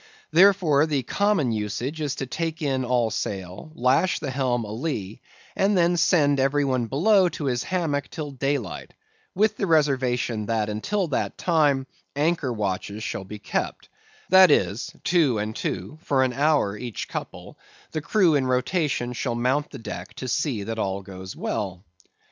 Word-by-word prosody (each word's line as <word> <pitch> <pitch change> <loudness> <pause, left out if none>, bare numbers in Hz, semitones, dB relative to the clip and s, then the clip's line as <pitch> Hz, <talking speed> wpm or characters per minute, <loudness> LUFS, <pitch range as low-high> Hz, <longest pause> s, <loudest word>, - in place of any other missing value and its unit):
Therefore, 170 -4 +5
the 145 -4 0
common 200 - +1
usage 115 +8 -3
is 145 -2 -1
to 135 - -4
take 165 +4 -3
in 135 -3 0
all 120 -2 +1
sail; 95 - -5
lash 130 +8 +2
the 135 - -4
helm 125 -3 0
a'lee; 110 -2 -4 0.3
and 200 0 +2
then 175 0 +3
send 150 -5 +3
every 140 +2 +2
one 130 -3 0
below 185 - +4
to 155 -2 -5
his 125 -3 0
hammock 160 -5 -1
till 150 -2 -5
daylight, 135 - -3 0.4
with 215 +2 +2
the 195 - -1
reservation 130 -8 +1
that, 110 -2 0
until 185 - -1
that 140 - -2
time, 150 -6 +2 0.3
anchor 150 -2 +1
watches 105 -1 -3
shall 95 - -4
be 105 +2 -8
kept; - - -3 0.4
that 185 0 +8
is, 100 -5 +1
two 155 -9 +3
and 105 +1 -3
two 95 - -4
for 135 -2 +2
an 130 -1 0
hour, 140 -7 +2
each 120 +1 -5
couple, - - -7 0.3
the 155 - -3
crew 180 0 +3
in 135 -3 +2
rotation 125 -1 0
shall 120 0 -2
mount 130 +5 0
the - - -9
deck 90 -4 -7
to 130 - -6
see 120 -4 -1
that 115 +2 -4
all 100 -1 -2
goes 95 0 -9
well. 95 -2 -3
135 Hz, 165 wpm, -24 LUFS, 115-155 Hz, 0.4 s, that